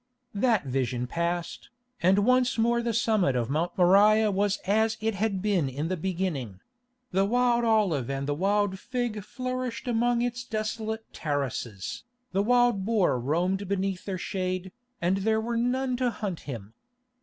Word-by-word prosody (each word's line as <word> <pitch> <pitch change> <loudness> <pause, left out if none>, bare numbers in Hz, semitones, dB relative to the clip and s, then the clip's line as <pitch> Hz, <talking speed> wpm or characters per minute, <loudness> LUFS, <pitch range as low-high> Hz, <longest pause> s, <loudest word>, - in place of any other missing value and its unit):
That 215 - +2
vision 125 -2 -1
passed, 170 +5 -3 0.3
and 195 +3 +4
once 255 -1 +3
more 235 +1 +2
the 235 0 -1
summit 215 - +2
of 120 +1 -1
Mount 160 +4 -1
Moriah 205 +4 +5
was 200 +1 +1
as 220 +3 +2
it 225 +1 0
had 200 -1 -1
been 190 -10 +1
in 145 +5 -3
the 185 - 0
beginning: 165 - -3 0.5
the 190 +1 +2
wild 240 +3 +2
olive 200 - +2
and 135 0 -2
the 145 - +1
wild 195 +3 +1
fig 240 -4 -3
flourished 255 +2 -4
among 240 0 +2
its 245 0 -2
desolate 220 -1 -3
terraces, 130 - -3 0.3
the 195 - +1
wild 245 -2 +3
boar 195 - +2
roamed 180 +9 0
beneath 195 -1 -2
their 195 -2 -3
shade, 185 0 -3 0.3
and 180 +3 +2
there 220 +3 +1
were 235 +2 -2
none 250 +2 0
to 250 -1 +1
hunt 200 -7 -4
him. 110 -4 -7
200 Hz, 155 wpm, -27 LUFS, 170-230 Hz, 0.5 s, Moriah